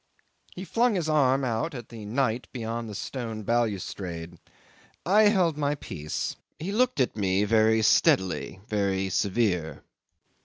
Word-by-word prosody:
'He 185 - -6
flung 235 +2 +2
his 170 -4 -1
arm 135 -3 +3
out 125 +5 -1
at 120 -3 -8
the 115 -3 -9
night 120 +1 -1
beyond 115 -2 -4
the 105 - -7
stone 115 -1 -5
balustrade. 95 -7 -2 0.7
I 210 +4 +5
held 185 -7 +3
my 145 0 +1
peace. 75 - -5 0.2
He 180 +5 -4
looked 250 - +1
at 130 - +1
me 100 -1 +1
very 110 +1 +3
steadily, 95 -2 +2
very 95 -2 0
severe. 90 -7 0
115 Hz, 140 wpm, -27 LUFS, 100-140 Hz, 0.7 s, I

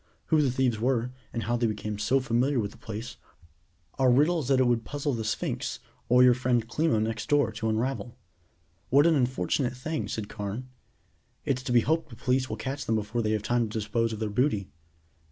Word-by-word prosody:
Who 155 - +6
the 140 - +2
thieves 125 -3 +1
were, 125 0 0 0.2
and 115 - -3
how 120 +1 0
they 120 -1 +1
became 105 -1 -4
so 125 +6 +2
familiar 130 +2 +1
with 100 -3 -2
the - - -16
place 110 +2 -7 0.8
are 130 -1 +5
riddles 150 +3 +3
that 135 -1 +3
it 130 - +4
would 120 -2 +2
puzzle 145 +3 -2
the 115 -2 -2
Sphinx, 110 -1 -2 0.3
or 125 +1 +6
your 125 -1 +7
friend 120 -2 0
Klimo 135 -2 +1
next 110 0 -2
door, 145 -1 +3
to 110 - -2
unravel." 120 +2 -2 0.7
"What 140 +4 +5
an 170 - +5
unfortunate 130 - 0
thing," 155 +5 -3
said 110 -2 -4
Carne. 105 +6 -5 0.8
"It's 130 -2 0
to 130 -1 -4
be 120 -1 +5
hoped 160 +6 0
the 115 - -10
police 130 +3 0
will 110 - -4
catch 135 +5 -4
them 110 - +2
before 110 +2 -1
they 110 -1 0
have 105 -1 -1
time 120 +1 +1
to 110 - -4
dispose 115 +2 0
of 110 - -4
their 110 -1 -3
booty." 105 -4 0
120 Hz, 210 wpm, -28 LUFS, 110-130 Hz, 0.8 s, your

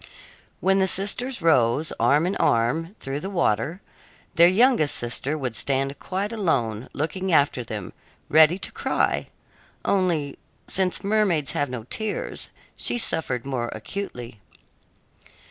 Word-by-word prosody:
When 195 +1 +3
the 190 - +3
sisters 205 +4 +1
rose, 145 -1 +3
arm 140 +8 +3
in 185 - -1
arm, 140 - +1
through 135 +1 -4
the 190 - -5
water, 170 - 0 0.5
their 170 +1 +7
youngest 195 - +4
sister 130 +5 -2
would 130 -5 -4
stand 135 0 0
quite 195 +3 -3
alone, 125 - -1
looking 185 +6 -3
after 140 -5 +3
them, 105 -5 -7 0.3
ready 160 +3 +5
to - - -3
cry - - 0 0.6
only, 170 -8 0 0.3
since 185 -1 0
mermaids 195 -8 +1
have 145 -1 -1
no 125 -3 -5
tears, 215 - -4 0.3
she - - -1
suffered 155 - 0
more 130 -4 -2
acutely. 120 - -7
155 Hz, 130 wpm, -24 LUFS, 125-190 Hz, 0.6 s, their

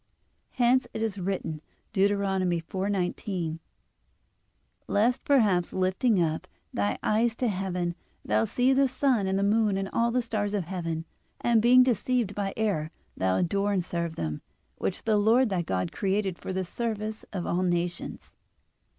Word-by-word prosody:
Hence 250 +1 +3
it 220 - -1
is 205 -3 -2
written 175 -5 -3 0.3
(Deut. 200 -1 +4
4:19): 185 -2 -1 1.3
"Lest 230 +5 +2
perhaps 210 -11 +3
lifting 190 +4 +2
up 160 -2 0 0.3
thy 100 0 0
eyes 225 +2 +2
to 250 - 0
heaven, 180 -4 -1 0.3
thou 110 +1 +2
see 250 - +2
the 270 +1 +4
sun 255 -6 +1
and 190 0 +1
the 195 - +1
moon 210 -1 +2
and 195 0 -2
all 235 0 +2
the 245 +1 +1
stars 210 -2 -1
of 200 - 0
heaven, 165 -2 -4 0.3
and 235 -2 +3
being 250 +2 +7
deceived 245 -2 +1
by 200 -1 -2
error 195 -9 0 0.3
thou 95 0 +1
adore 200 - +1
and 185 -3 0
serve 170 -2 -3
them, 75 -2 -3 0.4
which 185 - -2
the 215 -2 +2
Lord 225 +4 +4
thy 185 -3 0
God 90 - -2
created 195 - -1
for - - -5
the 190 0 -2
service 215 +1 -3
of 185 -4 -3
all 175 - 0
nations." 175 -1 -2
195 Hz, 155 wpm, -27 LUFS, 175-225 Hz, 1.3 s, being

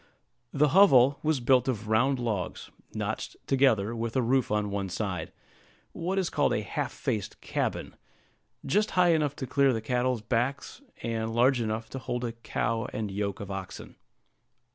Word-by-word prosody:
The 150 +1 +3
hovel 140 -7 +6
was 155 -2 +1
built 125 +1 +3
of 110 -4 -2
round 130 +5 +2
logs, 110 -6 -3 0.2
notched - - -4
together, 120 -5 +2
with 115 0 -3
a 130 - +3
roof 130 +1 +2
on 105 -1 0
one 100 -1 -2
side, 90 -4 -3 0.6
what 185 +3 -3
is 185 -3 0
called - - +2
a - - -1
half - - -3
faced 105 -4 -3
cabin, - - -3 0.7
just 210 +10 +2
high 180 -1 +5
enough 150 -3 +2
to 130 - -5
clear 135 +2 +3
the 115 - -1
cattle's 125 0 -1
backs, 125 - -2 0.2
and 115 -1 -2
large 125 +1 +4
enough 110 0 -2
to 135 - -5
hold 125 0 -3
a 115 - -2
cow 115 -1 -2
and 105 -2 -3
yoke 100 0 -3
of 100 -1 -6
oxen. 95 -1 -7
120 Hz, 165 wpm, -28 LUFS, 110-135 Hz, 0.7 s, hovel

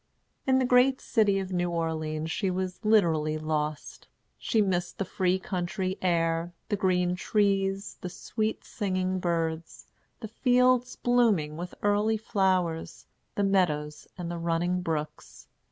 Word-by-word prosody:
In 260 0 +4
the 260 - +2
great 250 +2 +4
city 210 -4 +2
of 190 -1 -3
New 175 0 0
Orleans 160 -2 -2
she 195 +2 -1
was 185 +2 -3
literally 165 -8 +3
lost. 155 -1 -3 0.3
She 225 - 0
missed 180 -4 0
the 195 - -2
free 185 0 +1
country 185 0 -3
air, 165 -1 0 0.2
the 210 - +1
green 180 -2 +1
trees, 195 0 0
the 180 - -4
sweet 215 +4 -3
singing 185 -3 -2
birds, 165 -2 -2 0.3
the 220 - -6
fields 250 +2 +2
blooming 220 -12 +2
with 175 +2 -7
early 205 +2 +2
flowers, 185 -6 -1 0.3
the 205 - +1
meadows 155 -7 0
and 175 -1 -4
the 170 - -4
running 170 +2 0
brooks. 155 -3 -5
185 Hz, 135 wpm, -28 LUFS, 165-205 Hz, 0.3 s, In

